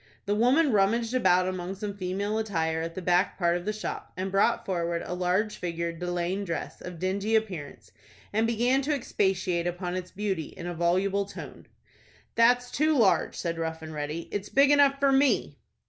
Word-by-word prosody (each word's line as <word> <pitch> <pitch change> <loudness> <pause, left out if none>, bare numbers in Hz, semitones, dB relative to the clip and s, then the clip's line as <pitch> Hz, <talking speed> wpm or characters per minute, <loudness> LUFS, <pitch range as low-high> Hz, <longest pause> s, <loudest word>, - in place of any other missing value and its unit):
The 205 - 0
woman 260 +8 +3
rummaged 225 +3 +2
about 185 -7 +3
among 185 0 -4
some 200 0 -5
female 200 +3 -2
attire 160 -7 -1
at 165 0 -5
the 185 - -5
back 180 +2 +2
part 175 -2 +2
of 175 0 -4
the 210 - 0
shop, 215 0 -5
and 190 +1 -3
brought 195 +1 +2
forward 170 -2 -1
a - - -4
large 185 +4 0
figured 170 -1 -3
de 180 0 -3
laine 175 +3 -1
dress, 170 -4 -5
of 180 -1 -7
dingy 195 +5 0
appearance, 185 -10 -3 0.4
and 220 +2 +2
began 240 +4 +2
to 290 +2 0
expatiate 190 -8 0
upon 175 0 -3
its 185 0 -4
beauty 195 -6 -3
in 170 - -7
a 175 - -3
voluble 190 +4 +1
tone. 200 - -10 0.7
"That's 245 +1 +3
too 305 +2 +2
large," 220 -6 +3
said 165 -1 -3
Rough 160 0 -3
and 155 0 -7
Ready. 150 +2 -4
"It's 205 -1 -4
big 275 +1 +5
enough 280 -1 +5
for 275 -1 +3
me." 270 0 +2
190 Hz, 190 wpm, -27 LUFS, 175-220 Hz, 0.7 s, big